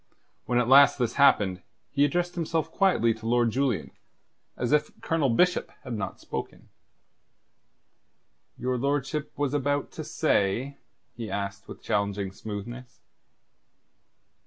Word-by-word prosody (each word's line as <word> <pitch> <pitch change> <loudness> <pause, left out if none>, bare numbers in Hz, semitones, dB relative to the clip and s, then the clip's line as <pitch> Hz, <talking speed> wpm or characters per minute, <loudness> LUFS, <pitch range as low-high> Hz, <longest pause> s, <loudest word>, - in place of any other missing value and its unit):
When 120 - +1
at 120 -1 +2
last 140 +2 +7
this 120 -4 0
happened, 95 -9 +4 0.3
he 140 - +2
addressed 175 +4 +1
himself 165 -2 -2
quietly 180 - +3
to 110 0 -8
Lord 120 -1 +3
Julian, 130 -3 -1 0.7
as 120 - -1
if 150 0 +3
Colonel 160 -4 +1
Bishop 180 +10 +2
had 125 - -6
not 105 -3 -4
spoken. - - -7 1.9
"Your 125 0 -1
lordship 140 +2 -1
was 145 -1 -1
about 145 0 0
to - - -6
say?" 125 +8 0 0.4
he 115 -2 -6
asked, 100 0 -4
with - - -11
challenging 100 -2 -1
smoothness. 115 +5 -8
125 Hz, 125 wpm, -27 LUFS, 110-145 Hz, 1.9 s, last